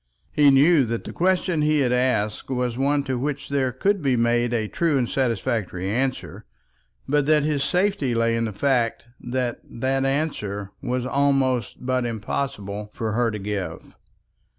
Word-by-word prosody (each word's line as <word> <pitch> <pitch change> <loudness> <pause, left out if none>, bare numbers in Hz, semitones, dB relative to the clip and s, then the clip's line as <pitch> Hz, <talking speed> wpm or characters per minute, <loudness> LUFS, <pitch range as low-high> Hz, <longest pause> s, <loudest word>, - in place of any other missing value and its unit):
He 145 -1 +5
knew 140 +3 +5
that 115 0 -3
the - - -8
question 180 -2 +1
he 150 0 +3
had 125 -2 +2
asked 125 -4 0
was 125 -2 -1
one 140 +2 +1
to 130 -3 -2
which 145 +1 -3
there 135 -2 +1
could 195 +10 0
be 135 -3 +2
made 120 0 +2
a 110 -3 0
true 160 +4 +1
and 125 -2 +1
satisfactory 110 -7 -1
answer, 130 +3 -2 0.6
but 145 0 +1
that 155 -1 +4
his 145 -2 0
safety 180 - +1
lay 115 0 +2
in 115 0 0
the 110 - -3
fact 120 +1 0
that 125 0 -2
that 135 +3 -1
answer 110 -9 -2
was 125 -1 -2
all 135 -2 +2 0.2
but 130 0 -1
impossible 105 -2 -4
for 110 -1 -2
her 120 +2 +1
to 105 - -4
give. 100 -1 -5
130 Hz, 165 wpm, -23 LUFS, 115-140 Hz, 0.6 s, He